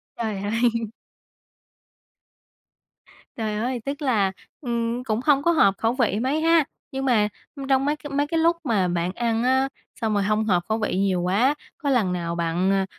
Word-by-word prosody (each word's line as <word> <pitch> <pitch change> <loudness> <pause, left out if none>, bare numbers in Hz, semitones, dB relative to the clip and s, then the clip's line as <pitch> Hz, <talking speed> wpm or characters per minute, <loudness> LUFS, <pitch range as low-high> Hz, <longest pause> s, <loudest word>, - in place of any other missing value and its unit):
Trời 220 -3 -3
ơi! 220 +3 -1 2.7
Trời 215 -2 -2
ơi, 245 +2 -2
tức 280 +2 -4
là, 215 -9 +2 0.3
ừm, 235 -1 -2
cũng 220 -3 -1
hông 285 -2 +4
có 340 - +4
hợp 200 - +4
khẩu 225 +1 +1
vị 230 -6 +1
mấy 270 +6 0
ha. 330 0 +4 0.3
Nhưng 270 -1 -3
mà, 225 -5 +3 0.3
ưm, 275 -2 -6
trong 270 0 +2
mấy 295 +1 +1
cái 290 -1 -10
mấy 285 +1 0
cái 330 - -1
lúc 335 +1 +3
mà 215 - +1
bạn 175 0 -1
ăn 230 +1 0
á, 260 +2 +2 0.3
xong 220 -1 0
rồi 205 -1 +1
hông 215 +2 +1
hợp 180 -5 +2
khẩu 220 - +1
vị 215 - -1
nhiều 190 -2 +1
quá, 210 +11 +2 0.2
có 290 - -2
lần 220 -9 +2
nào 170 -1 -3
bạn, 170 +3 0
ờ, 195 -1 +2
230 Hz, 190 wpm, -24 LUFS, 200-270 Hz, 2.7 s, hông